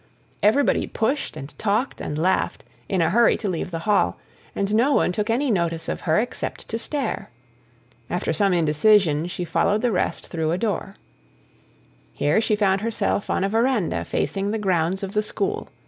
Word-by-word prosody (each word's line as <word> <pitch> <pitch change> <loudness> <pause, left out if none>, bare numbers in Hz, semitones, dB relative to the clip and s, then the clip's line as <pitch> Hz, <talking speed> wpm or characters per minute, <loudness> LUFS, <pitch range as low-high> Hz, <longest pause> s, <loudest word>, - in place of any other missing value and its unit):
Everybody 225 +7 +3
pushed, 270 +6 -1
and 140 +2 -9
talked, 220 +5 0
and 150 - -4
laughed, 180 +4 0 0.3
in 185 -4 +2
a 165 - +1
hurry 235 +4 +4
to 210 - -4
leave 175 -2 -2
the 170 - -4
hall, 210 -1 +2 0.4
and 200 +1 -1
no 245 +7 +3
one - - +3
took 210 +4 -2
any 250 +3 +1
notice 170 -4 -1
of - - -3
her 155 - +4
except 240 +4 -3
to 225 - -2
stare. 275 -1 -3 0.8
After 175 -2 -1
some 195 +5 +2
indecision, 165 0 +3
she 180 0 -4
followed 205 +6 +1
the 245 - +2
rest 180 - -1
through 160 -2 -2
a - - 0
door. 200 -2 -2 1.2
Here 150 +9 +2
she 220 -1 +1
found 195 -2 +2
herself 225 -2 -1
on - - +1
a 195 - +1
verandah 220 - +1
facing 195 - -1
the 220 - -1
grounds 185 -2 0
of 195 - -4
the 210 - +1
school. 400 - -3
200 Hz, 180 wpm, -23 LUFS, 175-225 Hz, 1.2 s, hurry